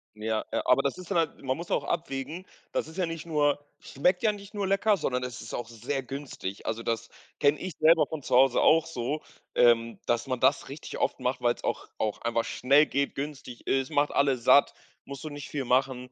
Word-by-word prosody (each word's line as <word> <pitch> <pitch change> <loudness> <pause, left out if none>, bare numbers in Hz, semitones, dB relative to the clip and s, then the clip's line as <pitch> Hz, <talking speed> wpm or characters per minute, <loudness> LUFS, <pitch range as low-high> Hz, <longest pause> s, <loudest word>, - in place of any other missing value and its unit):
Ja, 110 0 -2
ja, - - +1
aber 130 +2 +4
das 140 +6 -1
ist 180 - -10
halt 170 -4 0
man 130 +1 -1
muss 170 0 -7
auch - - +1
abwägen, 155 +3 -3 0.3
das - - -1
ist 160 - -12
ja 180 -3 +1
nicht 165 -1 -6
nur 145 -3 +2 0.2
schmeckt 180 +7 0
ja 215 - +3
nicht 200 0 -11
nur 200 -2 -2
lecker, 200 +2 +3
sondern 125 -8 -2
es 125 -2 -6
ist 110 - -6
auch 120 -2 -4
sehr 125 +4 -4
günstig. 130 -8 -6
Also, 115 +1 -2
das 115 0 -2 0.3
kenne 145 +1 +3
ich 185 -3 -5
selber 155 -1 +6
von 155 -1 -6
zu 125 - 0
Hause 130 -1 +5
auch 165 0 +5
so, 145 +2 -3 0.3
ähm, 115 -1 +4
dass 120 +2 0
man 130 -1 -2
das - - +2
richtig - - -7
oft - - 0
macht, - - -1
weil - - +2
es - - -16
auch - - -2
auch 105 -1 -2
einfach 115 0 0
schnell 140 +4 +4
geht, 140 0 -1
günstig 140 -3 -6
ist, 135 -1 +1
macht 145 +1 +1
alle 140 -2 +2
satt, 130 +4 +5 0.3
musst 140 +1 -8
du 155 - -5
nicht 145 0 -8
viel 140 -3 -3
machen. 125 0 0
140 Hz, 225 wpm, -28 LUFS, 125-160 Hz, 0.3 s, selber